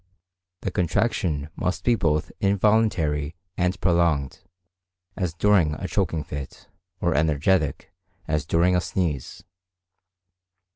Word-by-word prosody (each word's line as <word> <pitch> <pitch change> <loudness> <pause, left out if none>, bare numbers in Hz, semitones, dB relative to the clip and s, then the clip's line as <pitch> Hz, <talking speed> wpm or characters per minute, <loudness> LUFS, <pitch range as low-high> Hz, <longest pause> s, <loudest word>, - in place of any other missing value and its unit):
The 95 - -2
contraction 85 -5 0
must 90 - -2
be 120 - +4
both 75 -8 0
involuntary 95 -7 +2 0.2
and 90 +1 0
prolonged, 85 -5 +1 0.8
as 90 -5 -2
during 90 -5 +3
a - - -5
choking 80 -2 -1
fit, 70 -2 -8 0.3
or 85 -1 +2
energetic, 75 +2 +1 0.3
as 75 -1 -1
during 85 +3 +3
a 90 - +2
sneeze. 85 -6 -3
85 Hz, 105 wpm, -24 LUFS, 75-95 Hz, 0.8 s, be